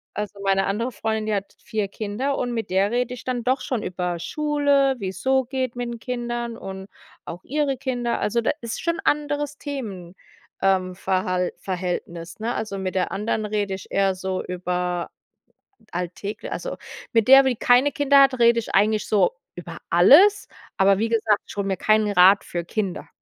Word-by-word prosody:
Also, 210 -1 -5
meine 195 0 +2
andere 230 +6 -1
Freundin, 220 -1 -2
die 215 - 0
hat 200 0 -5
4 210 -2 -2
Kinder 220 +8 -3
und 245 -1 -2
mit 225 -1 -3
der 195 +2 +2
rede 245 +1 -1
ich 250 - -11
dann 250 -2 -2
doch 255 +3 +1
schon 250 -5 -2
über 180 -1 -3
Schule, 285 - +1
wie's 190 -2 -5
so 265 0 +2
geht 255 -1 -3
mit 245 -1 -3
'n 235 - -5
Kindern 240 -1 -4
und 190 -1 -8 0.4
auch 175 +2 -8
ihre 285 -1 -1
Kinder. 245 -3 -2
Also, 235 +3 0
da - - +1
ist 230 -1 -5
schon 335 +1 -1
anderes 295 -4 -1
Themen, 205 - -6 0.5
ähm, 185 -1 +1
Verhalt 185 -1 -1
Verhältnis, 175 -2 -5
ne? 230 +3 -2
Also 215 -3 -4
mit 190 -1 -4
der 185 - 0
anderen 215 +1 -2
rede 205 -2 -2
ich 190 - -12
eher 195 -1 +2
so 185 0 -3
über 180 -1 -3 0.8
alltägl 180 +4 -5
also - - -4 0.4
mit 225 -1 +3
der, 270 +1 +9
die 260 -2 +1
keine 245 +5 +4
Kinder 285 -1 +4
hat, 265 -2 +3
rede 235 0 +5
ich 225 - -7
eigentlich 210 +2 +2
so 195 -4 +2 0.2
über 170 -1 -8
alles, 310 - +6 0.3
aber 195 0 +4
wie 225 +1 0
gesagt, 220 -2 +2
ich - - -10
hole 200 -1 -1
mir 190 -2 -1
keinen 215 +1 +2
Rat 195 +1 +6
für 170 -1 -4
Kinder, 195 -1 -3
215 Hz, 185 wpm, -23 LUFS, 190-250 Hz, 0.8 s, der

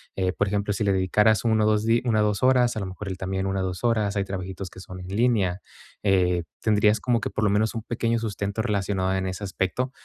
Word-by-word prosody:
eh, 95 -1 0
por 100 - 0
ejemplo, 100 0 -1
si 105 - -2
le 100 -1 +2
dedicaras 105 +3 +3
1 110 -2 +2
o - - +3
2 110 0 +2
di 115 +2 +3
1 110 -3 +2
o - - +4
2 105 +2 0
horas, 125 -2 +4
a - - 0
lo 100 - -3
mejor 95 +2 -7
él 95 -1 -4
también 95 +1 -2
1 95 0 -1
o - - -1
2 90 +2 -4
horas, 110 -4 +1
hay 100 -1 0
trabajitos 95 0 -5
que 95 - -13
son 95 -1 -9
en 90 - -8
línea, 100 -3 +1 0.4
eh, 90 -3 +2 0.2
tendrías 105 0 +3
como 120 -2 +1
que - - -4
por 110 - -2
lo 105 - +3
menos 105 +3 +1
un 115 - -4
pequeño 115 0 -1
sustento 100 -1 -3
relacionado 95 -2 0
en 95 0 -1
ese 95 +2 -4
aspecto, 100 +7 -2
100 Hz, 255 wpm, -25 LUFS, 95-110 Hz, 0.4 s, o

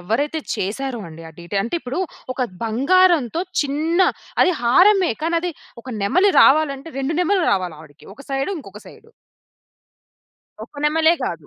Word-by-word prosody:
ఎవ్వరైతే 275 - -1 0.2
చేశారో 240 +6 -3
అండి, 165 +1 -12
ఆ - - -12
డీటెయి 195 +3 -2
అంటే 235 - -4
ఇప్పుడు 265 +7 -4 0.3
ఒక 260 - -7 0.2
బంగారంతో 315 +4 +2 0.2
చిన్న 310 +5 -1 0.4
అది 365 - +3
హారమే. 360 - +4
కానది 335 +1 -1 0.3
ఒక 260 - -12
నెమలి 370 - +3
రావాలంటే, 280 +1 +3
రెండు 275 +4 -2
నెమళ్ళు 360 0 +1
రావాలి 180 -5 -2
ఆవిడకి. 150 -1 -17
ఒక 280 - -13
సైడ్, 270 +5 -1
ఇంకొక - - -12
సైడ్. 445 - -16 1.6
ఒక - - -22
నెమలే 320 +2 +3
గాదు. 165 -9 -4
280 Hz, 140 wpm, -20 LUFS, 225-335 Hz, 1.6 s, హారమే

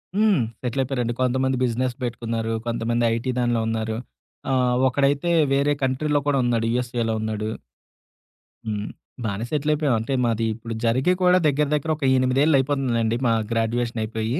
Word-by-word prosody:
హ్మ్. 205 - +3 0.2
సెటలయపోయారండి. 125 -1 -1
కొంతమంది 130 +1 +1
బిజినెస్ 125 +1 0
పెట్టుకున్నారు. 115 -1 -3 0.2
కొంతమంది 120 0 0
ఐటీ - - +1
ఐటీ 130 +2 -2
దానిలో 120 -2 +1
ఉన్నారు. 110 0 -2 0.5
ఆహ్, 125 -1 +2
ఒకడైతే 140 +5 +1 0.2
వేరే 140 +1 +2
కంట్రీలో 145 +3 +1
కూడా 145 -1 +2
ఉన్నాడు. 115 -2 +1
యూఎస్ఏలో 120 -2 -1
ఉన్నాడు. 110 0 -2 1.2
హ్మ్. 105 -1 -3 0.4
బానే 100 +1 -2
సెటలయిపోయాం. 150 -2 +1
అంటే 115 +5 -3
మాది 115 -1 0
ఇప్పుడు 115 +1 -7
జరిగి 130 +10 +2
కూడా 180 0 +5
దగ్గర 145 +1 +2
దగ్గర 155 +2 -1
ఒక 150 - -8
8 130 +1 +2
ఏళ్ళు 155 -2 +4
అయిపోతుందిలేండి. 125 -5 0
మా 115 - +3 0.2
గ్రాడ్యుయేషన్ 115 +1 -1
అయిపోయి. 110 +5 -2
125 Hz, 145 wpm, -23 LUFS, 115-140 Hz, 1.2 s, కూడా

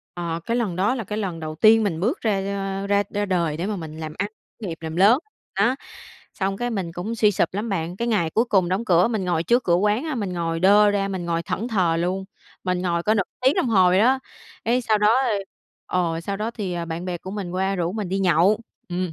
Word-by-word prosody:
À, 170 -1 -3
cái 235 - 0
lần 215 -8 -1
đó 205 +8 +1
là 230 - -3
cái 210 +3 -5
lần 185 -6 -3
đầu 155 0 -5
tiên 220 +5 +6
mình 165 -6 -1
bước 240 - -1
ra, 215 -4 +1 0.4
ơ, 200 - -4
ra 200 0 +3
ra 205 0 -1
đời 170 -5 0
để 175 - -2
mà 215 - -2
mình 160 -3 -7
làm 155 -1 -5
ăn, 200 +2 -1 0.3
khởi 205 - -4
nghiệp, 165 -1 -5
làm 160 0 -5
lớn. 205 +8 +6 0.4
Đó, 250 +2 +3 0.6
xong 195 0 -1
cái 245 +2 -2
mình 185 -6 -3
cũng 195 +7 -4
suy 215 -2 +4
sụp 190 - +1
lắm 210 +4 -3
bạn. 175 -2 -2
Cái 235 +2 -2
ngày 170 -8 +1
cuối 225 - +2
cùng 190 -7 +2
đóng 195 +5 -1
cửa, 180 +2 +4
mình 215 -5 -1
ngồi 170 -2 0
trước 240 +8 +2
cửa 170 - +3
quán 210 - +2
á, 310 -3 -2
mình 205 -6 -3
ngồi 165 -1 -2
đơ 205 +3 +6
ra, 200 -1 0
mình 185 -3 -4
ngồi 170 0 -1
thẫn 230 +7 -3
thờ 180 -7 +2
luôn, 185 +3 -1 0.4
mình 180 -1 0
ngồi 170 -2 0
cỡ 215 +3 +2
nữa 200 - +2 0.2
tiếng 265 +3 +4
đồng 250 - +1
hồ 190 -5 +5
vậy 185 +1 +3
đó. 255 +5 +4 0.5
Cái 240 +3 +2
sau 220 -3 +1
đó, 210 - +4 0.8
ơ 175 -2 0
ờ, 165 - -3
sau 195 +3 -3
đó 215 +2 -2
thì, 205 -6 -4
à, 170 -1 -3
bạn 165 +2 -5
bè 180 -2 -3
của 190 - -8
mình 200 -3 -4
qua 190 +2 0
rủ 175 0 -1
mình 210 -4 -3
đi 195 +2 -1
nhậu. 185 +3 +3 0.3
Ừm. 180 -1 -2
190 Hz, 260 wpm, -23 LUFS, 175-215 Hz, 0.8 s, tiên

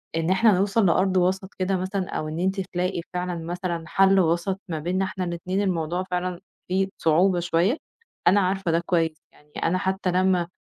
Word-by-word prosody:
إن 165 +1 0
إحنا 210 +4 +5
نوصَل 200 +2 +2
لأرض 185 +2 +3
وسَط 190 +2 0
كده 190 +1 +1
مثلًا، 185 0 -3
أو 155 - -3
إن 155 +2 -4
أنتِ 190 +2 0
تلاقي 180 -1 -2
فعلًا 180 0 -2
مثلًا 175 -1 -3
حَل 195 +2 +4
وسَط 175 +3 +1
ما 160 -3 -3
بيننا 185 +5 -1
إحنا 190 -1 -4
الإتنين، 180 +3 -2
الموضوع 175 -2 -1
فعلًا 180 -1 -3 0.3
فيه 190 +1 0
صعوبة 175 +3 +3
شوية، 175 - +1 0.5
أنا 195 +3 +6
عارفة 190 -1 0
ده 165 - +3
كويس، 165 -3 +1 0.2
يعني 150 0 -24
أنا 175 +2 +2
حتى 190 0 -1
لمّا 185 -1 +2
185 Hz, 180 wpm, -24 LUFS, 170-190 Hz, 0.5 s, أنا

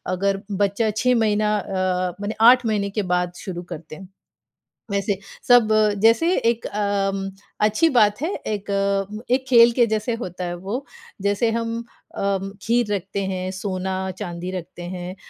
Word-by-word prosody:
अगर 195 +1 0
बच्चा 205 +2 +1
6 250 +4 +2
महीना 215 -1 +2
अ, 185 -2 -1
मने 205 +2 -3
8 250 -1 +5
महीने 205 -2 0
के 205 0 -2
बाद 180 0 -1
शुरू 180 -2 -5
करते 155 0 -9
हैं। 190 +1 -11 0.8
वैसे 200 0 0 0.3
सब 245 -3 +6 0.3
जैसे 330 +11 +4
एक 230 0 0
अ, 200 -1 0
म 195 0 -4 0.3
अच्छी 215 +10 +3
बात 215 -3 +3
है, 325 - 0 0.2
एक 205 -2 -3 0.7
एक 260 +1 +2
खेल 235 -1 +7
के 240 - +6
जैसे 220 +2 -1
होता 180 -2 -5
है 175 - -3
वो। 200 +10 -5 0.4
जैसे 205 +3 +1
हम 230 0 -2 0.4
अ, 195 -1 0 0.2
खीर 230 -2 +1
रखते 195 +1 -3
हैं, 185 -1 -3
सोना-चांदी 185 -1 -4
रखते 180 -1 -7
हैं। 180 +1 -6
200 Hz, 155 wpm, -22 LUFS, 185-225 Hz, 0.8 s, खेल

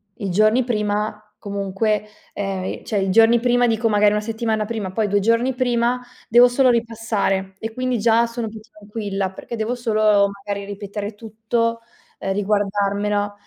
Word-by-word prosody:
i 200 - -4
giorni 215 +6 +3
prima 210 -2 -2
comunque 200 +1 -1 0.3
ehm, 195 -2 -3
i - - -5
cioè 210 -3 -1
i 190 - -1
giorni 225 +4 +5
prima 245 0 +3
dico 225 0 +1
magari 210 -1 +4
una 210 - +1
settimana 220 0 -2
prima, 210 -4 -4
poi 215 +2 0
2 205 0 +1
giorni 230 +5 +2
prima 245 0 +1 0.3
devo 240 +2 +7
solo 255 +1 +3
ripassare 225 -5 -1
e 225 - -4
quindi 255 -1 -1
già 230 +1 +4
sono 230 -1 -4
più 220 - -10
tranquilla, 205 -2 -4
perché 215 +5 -7
devo 225 +2 -2
solo, 215 -4 +3 0.2
magari, 200 -1 -3
ripetere 205 +1 -6
tutto, 230 +2 -2 0.4
ehm 195 - -2
riguardarmela. 205 0 0
215 Hz, 160 wpm, -21 LUFS, 205-230 Hz, 0.4 s, devo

